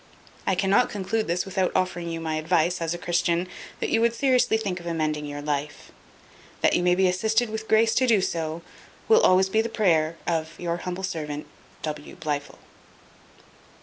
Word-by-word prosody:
I 190 - +3
cannot 195 +5 +3
conclude 210 +2 -2
this 175 +1 0
without 190 -1 0
offering 175 -2 -1
you 165 0 -4
my 160 -1 -2
advice, 170 +2 +1
as 165 +1 -1
a - - -5
Christian, 175 -1 0 0.3
that - - -2
you 225 - +3
would 235 0 +2
seriously 255 -3 +3
think 195 -5 -3
of 175 - -9
amending 155 -3 -1
your 145 0 -6
life. 150 0 -4 0.7
That - - +4
you - - +2
may 180 0 +3
be 190 0 +3
assisted 220 +5 +1
with 220 0 -5
grace 225 +1 +4
so 255 - +2
to 225 -4 +5
do, 165 -3 -2 0.5
will 450 0 +6
be - - 0
always 190 +1 +4
the 220 +3 +1
prayer 165 -8 +2
of 160 -1 -2
"Your 170 -1 -2
humble 180 +2 -5
servant, 150 -5 -4 0.4
"W. 150 -1 -5
BLIFIL." 145 -2 -4
180 Hz, 180 wpm, -25 LUFS, 160-205 Hz, 0.7 s, will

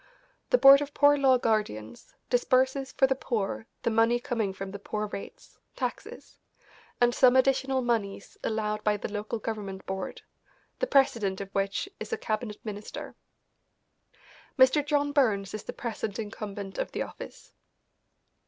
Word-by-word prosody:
The - - +5
Board 275 - +9
of 290 0 -5
Poor 290 0 +6
Law 270 -2 +4
Guardians 120 - -2 0.2
disburses 260 +2 +2
for 265 - +3
the 265 - +2
poor 225 -4 -3 0.2
the 230 - +1
money 230 +2 +3
coming 230 -5 -2
from 195 0 -7
the 200 - -7
Poor 210 +1 -3
Rates 205 -1 -9 0.2
(taxes), - - -6 0.6
and 240 0 +4
some 255 0 +5
additional 265 0 +2
moneys 210 -5 -2
allowed 215 -1 -2
by 210 -1 +2
the 205 - -6
local 210 +2 -3
government 205 -3 -5
board, 190 -1 -5 0.6
the - - 0
president 230 - +2
of 195 -1 -7
which 195 - -1
is - - -7
a 450 - 0
cabinet 215 - -3
minister. 210 -1 -7 1.4
Mr. 260 +3 +5
John 290 0 +1
Burns 210 -9 +1
is 215 - -4
the - - -6
present 220 -3 -4
incumbent 205 -3 -6
of - - -3
the - - -1
office. - - -11
225 Hz, 150 wpm, -28 LUFS, 205-260 Hz, 1.4 s, Board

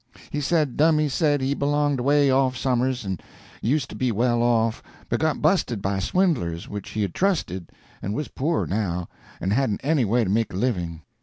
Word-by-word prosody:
He 150 - -2
said 150 -3 +1
Dummy 155 0 +4
said 145 0 +1
he 135 +1 +1
belonged 145 -1 +1
away 140 +2 +3
off 130 -1 +2
somers 130 -1 0
and 95 -3 -3 0.4
used 130 +3 +1
to - - -7
be 130 -2 0
well 120 +2 +1
off, 115 -1 +2 0.3
but 120 - 0
got 160 -1 0
busted 155 - +2
by 95 0 -1
swindlers 95 - 0
which 105 -1 -6
he 110 - -1
had 95 - -3
trusted, 150 - -1 0.3
and 100 +3 -3
was 150 - -2
poor 155 +5 0
now, 90 -4 -2 0.3
and 95 +4 0
hadn't 125 -4 +1
any 145 -2 +2
way 115 +3 +2
to 95 - -2
make 110 -1 0
a - - -3
living. 85 -8 -2
125 Hz, 190 wpm, -24 LUFS, 100-145 Hz, 0.4 s, Dummy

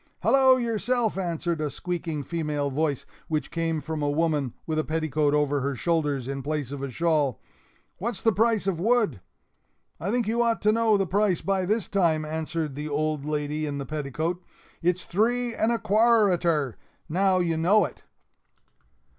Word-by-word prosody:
"Hallo 265 -1 +5
yourself!" 235 -1 0
answered 170 -3 -2
a 150 - -1
squeaking 165 -2 -4
female 150 -3 -2
voice, 145 -1 -1 0.2
which 155 -2 -2
came 165 -1 -1
from 155 +1 -4
a 145 - +1
woman, 150 -4 0
with 155 -1 -1
a - - +1
petticoat 155 -2 0
over 145 -1 +1
her 140 +1 -1
shoulders 145 -4 0
in 135 0 -3
place 145 -2 -3
of 140 -1 -5
a 140 - -3
shawl. 150 -2 +1 0.6
"What's 235 +5 -3
the 225 - +3
price 220 0 +2
of 190 -4 -1
wood?" 215 - +2 0.8
"I 185 - -3
think 235 0 +1
you 230 +2 +1
ought 230 -1 +2
to 210 - +5
know 225 -1 +3
the 195 - +1
price 195 0 +1
by 190 -2 0
this 215 0 0
time," 165 -5 +1
answered 160 -1 -3
the 150 +2 -5
old 150 0 -1
lady 150 0 -2
in 145 -1 -3
the 140 - -4
petticoat; 155 +5 -3 0.4
"it's 180 +1 +1
three 240 +5 +1
and 225 +1 +1
a 235 - +2
qua 230 +3 +4
a 190 -3 +3
rter! 165 -4 +1
and 125 - -9 0.3
now 190 +3 +2
you 170 -2 +1
know 180 +5 +4
it." - - -9
165 Hz, 180 wpm, -26 LUFS, 150-200 Hz, 0.8 s, Hallo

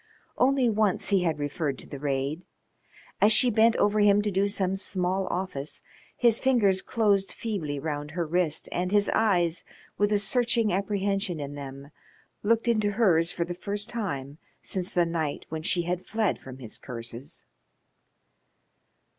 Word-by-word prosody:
Only 265 0 +3
once 215 -3 +1
he 195 -2 +3
had 165 -3 0
referred 145 -1 -2
to - - -11
the 140 - -8
raid. 140 +3 -2 0.8
As 210 - +6
she 245 +2 +5
bent 225 +2 +4
over 210 +1 +2
him 205 0 +5
to 210 - -1
do 195 +2 +2
some 195 -2 0
small 190 0 -1
office 175 -6 -4 0.3
his 235 -2 +4
fingers 210 -8 +3
closed 200 -2 +1
feebly 175 -11 -3
round 145 0 -4
her 170 +2 -2
wrist 160 -1 0
and 180 +1 -1
his 205 0 +3
eyes, 180 -6 +2 0.4
with 205 0 +2
a 210 - +4
searching 230 0 +2
apprehension 195 -2 -1
in 145 0 -5
them, 140 0 -9 0.5
looked 230 +2 +1
into 215 -3 +2
hers 175 -7 +3
for 170 - -2
the 175 - -4
first 205 +4 -3
time 150 - -4 0.2
since 185 -1 -2
the 175 -1 +2
night 160 -3 -3
when 160 0 -4
she 175 +2 +1
had 180 +1 -2
fled 220 -2 -1
from 130 -1 -10
his 120 -5 -9
curses. 120 +1 -8
185 Hz, 160 wpm, -27 LUFS, 155-210 Hz, 0.8 s, As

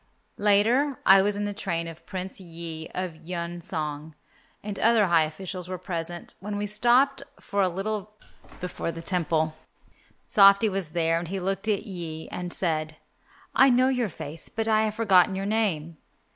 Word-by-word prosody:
Later 225 +7 +3
I 195 0 +8
was 205 +1 +1
in 205 - -1
the 205 - -3
train 170 -5 -3
of 165 0 -11
Prince 190 0 -6
Yi 165 -3 -7
of 180 -3 -3
Yun 170 +1 -5
song, 155 -2 -5 0.5
and 205 -1 -5
other 225 -2 +4
high 170 -3 +4
officials 180 +3 -7
were 185 - -3
present, 175 -1 -5
when 205 +2 -4
we 205 - -2
stopped 245 +6 +3 0.2
for 200 0 -1
a 185 - +3
little 205 +3 -3 0.5
before 180 -2 -4
the 165 0 -8
Temple. 160 -4 0 0.7
Softy 200 +1 +6
was 190 -5 -4
there, 165 -1 +2
and 170 - -6
he 195 +3 -3
looked 195 +3 -2
at 210 -3 +1
Yi 165 -4 -6
and 180 -1 -5
said, 155 -4 0 0.6
"I 270 - +6
know 255 +1 +4
your 250 -5 0
face, 155 -1 -7
but 225 0 -3
I 220 0 +3
have 215 0 -2
forgotten 195 -4 +4
your 195 +1 -3
name." 185 -7 -1
185 Hz, 170 wpm, -26 LUFS, 165-210 Hz, 0.7 s, I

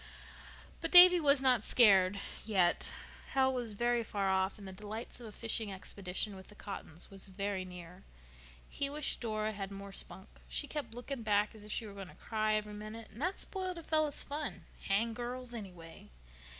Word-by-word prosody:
But - - -1
Davy 360 0 +11
was 280 -3 +4
not 250 -5 +4
scared—yet. 195 -3 +3 0.4
Hell 265 -1 +3
was 240 -4 -3
very 240 +2 +1
far 200 -3 -1
off, 190 +2 +1
and 200 -2 -10
the - - -7
delights 210 +5 -7
of 235 - -9
a - - -9
fishing 220 -1 -1
expedition 190 +1 -4
with 190 0 -11
the 210 - -15
Cottons 195 -5 -8
were 195 - -11
very 195 0 -3
near. 180 0 -10 0.7
He 280 - -1
wished 295 0 -3
Dora 215 -2 -1
had 195 -2 -5
more 200 0 -8
spunk. 190 0 -7 0.2
She - - -2
kept 290 -7 -5
looking 250 +1 -5
back 210 -1 +1
as 215 -2 -12
if 210 - -8
she 225 - -2
were 205 - -9
going 195 -2 -8
to - - -15
cry 215 -1 0
every 210 0 -2
minute, 215 +2 -8
and 230 - -11
that 365 +4 0
spoiled 370 -2 -4
a 335 - -8
fellow's 310 -2 +1
fun. 295 +1 -4 0.2
Hang 225 +4 +1
girls, 245 +1 -5
anyway. 180 -7 -10
215 Hz, 185 wpm, -33 LUFS, 195-245 Hz, 0.7 s, Davy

